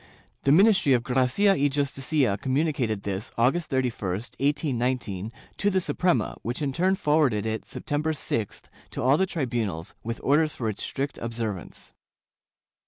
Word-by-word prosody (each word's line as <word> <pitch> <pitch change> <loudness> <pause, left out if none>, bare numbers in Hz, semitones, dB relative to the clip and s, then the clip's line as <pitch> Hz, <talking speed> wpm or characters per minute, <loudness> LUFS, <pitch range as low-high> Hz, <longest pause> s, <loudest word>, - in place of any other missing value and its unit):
The 140 - +5
ministry 185 -4 +5
of 120 -2 +2
Gracia 130 +11 +3
y 145 - +2
Justicia 140 -3 0
communicated 130 -6 0
this, 100 +3 -4
August 135 +9 +2
31, 125 -8 -1 0.3
1819, 125 - -1 0.3
to 205 - +2
the 190 -1 +2
Suprema, 175 -8 0
which 120 +2 -3
in 135 -2 -1
turn 185 +6 +2
forwarded 150 - +2
it, 110 0 -3
September 150 +2 -2
6th, 115 -8 -2 0.3
to - - -4
all 130 +3 +5
the 190 - +2
tribunals 115 - -2
with 115 +1 -4
orders 155 +2 +3
for 115 -3 -2
its 105 - -5
strict 140 +1 -3
observance. 115 -5 -5
130 Hz, 145 wpm, -26 LUFS, 115-150 Hz, 0.3 s, The